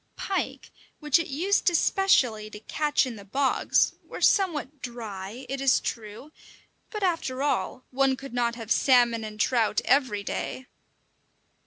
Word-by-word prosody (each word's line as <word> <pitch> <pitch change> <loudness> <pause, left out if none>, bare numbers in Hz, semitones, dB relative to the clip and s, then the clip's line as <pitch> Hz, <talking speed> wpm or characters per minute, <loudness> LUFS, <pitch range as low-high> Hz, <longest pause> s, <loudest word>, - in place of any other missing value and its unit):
Pike, 390 - -3 0.3
which 300 0 +3
it 335 - -3
used 360 +8 +1
especially 265 - +2
to 210 - -10
catch 295 +4 0
in 245 -4 -6
the 200 - -11
bogs, 265 +7 +1
were - - -9
somewhat 305 -8 +1
dry, 225 -1 -7
it 270 +1 -4
is 275 -1 +4
true, 220 +6 -6 0.6
but 425 -2 -5
after 305 -7 -1
all, 280 -2 -1
one 270 0 +2
could 275 -1 -10
not 235 -1 0
have 225 -2 -8
salmon 240 -4 +4
and 215 0 -8
trout 225 -2 +2
every 250 -8 +2
day! 260 +5 -4
260 Hz, 145 wpm, -26 LUFS, 225-295 Hz, 0.6 s, is